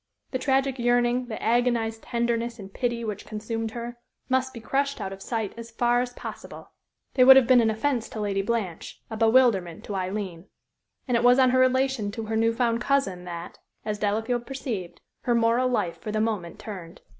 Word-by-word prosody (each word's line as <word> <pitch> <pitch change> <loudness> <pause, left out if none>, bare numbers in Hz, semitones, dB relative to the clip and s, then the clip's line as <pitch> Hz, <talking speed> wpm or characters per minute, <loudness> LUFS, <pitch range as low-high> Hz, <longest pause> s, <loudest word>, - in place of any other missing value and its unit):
The 255 - -1
tragic 270 0 +1
yearning, 245 +1 +2
the 220 - -5
agonized 230 -1 +1
tenderness 235 0 -1
and 195 -2 -10
pity 235 -2 -1
which 210 -2 -4
consumed 225 +1 -3
her, 235 +1 -7 0.3
must 260 0 +1
be 235 - -9
crushed 275 +4 -1
out 195 - -4
of 195 - -11
sight 220 -2 -3
as 230 0 -8
far 240 +1 +2
as 250 0 -3
possible. - - -9 0.4
They 255 - +5
would 265 +1 +10
have 265 -2 +6
been 250 0 +6
an 225 - +3
offence 230 +2 -1
to 220 - -7
Lady 200 -2 0
Blanche, 200 -5 -3
a - - -3
bewilderment 220 -7 +3
to 205 - -6
Aileen. 185 -2 -4 0.6
And 250 - +1
it 235 - +2
was 245 +1 +6
on 260 -1 +5
her 255 - +3
relation 255 -4 +2
to 225 0 -5
her 220 +1 -2
new 225 +1 +3
found 235 0 0
cousin 220 -11 0
that, 170 0 -7 0.3
as 210 -1 -2
Delafield 225 +4 -1
perceived, 235 -10 -5 0.2
her 240 - +2
moral 235 +2 +3
life 180 -9 -1
for 215 - -4
the 215 - 0
moment 210 -6 -2
turned. 180 -6 -9
230 Hz, 195 wpm, -26 LUFS, 210-250 Hz, 0.6 s, would